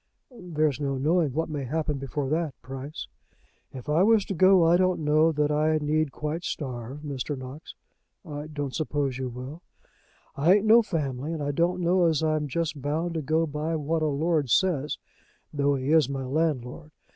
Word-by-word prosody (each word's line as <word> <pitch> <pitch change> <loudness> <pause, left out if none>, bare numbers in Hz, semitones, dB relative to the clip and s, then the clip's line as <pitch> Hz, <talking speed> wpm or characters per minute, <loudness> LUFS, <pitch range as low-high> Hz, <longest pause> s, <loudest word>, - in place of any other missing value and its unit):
"There's 155 - -1
no 140 -2 -1
knowing 155 +2 +2
what 160 +5 -1
may 150 -3 -4
happen 150 +2 -2
before 135 +1 -3
that, 160 -1 -2
Price." 135 +4 -7 0.7
"If 130 +2 -9
I 150 +3 +3
was 215 0 +4
to - - -3
go, 185 -1 +5
I 165 +1 +5
don't 185 -1 +2
know 155 +2 +3
that 150 -1 0
I 155 +1 +2
need 155 0 0
quite 150 +4 -4
starve, 130 -2 -5
Mr. 145 -1 -4
Knox." 130 +5 -9 0.5
"I 150 -2 -6
don't 145 -3 -4
suppose 145 -4 -2
you 130 -1 -3
will." 130 +7 -8 0.7
"I 160 +7 +5
ain't 205 +1 +1
no 225 +2 +7
family, 150 - -3
and 155 -3 -3
I 145 - -1
don't 175 +4 0
know 175 +1 +3
as 160 -1 +1
I'm 155 -1 +1
just 150 0 -2
bound 160 +5 -1
to 160 - -2
go 160 +3 +1
by 155 +2 -3
what 160 +1 -1
a 155 - +2
lord 150 -1 0
says, 150 - +1 0.6
though 145 -1 +2
he 135 +2 -2
is 155 -5 +4
my 135 -1 -3
landlord. 150 0 -2
150 Hz, 185 wpm, -26 LUFS, 140-165 Hz, 0.7 s, no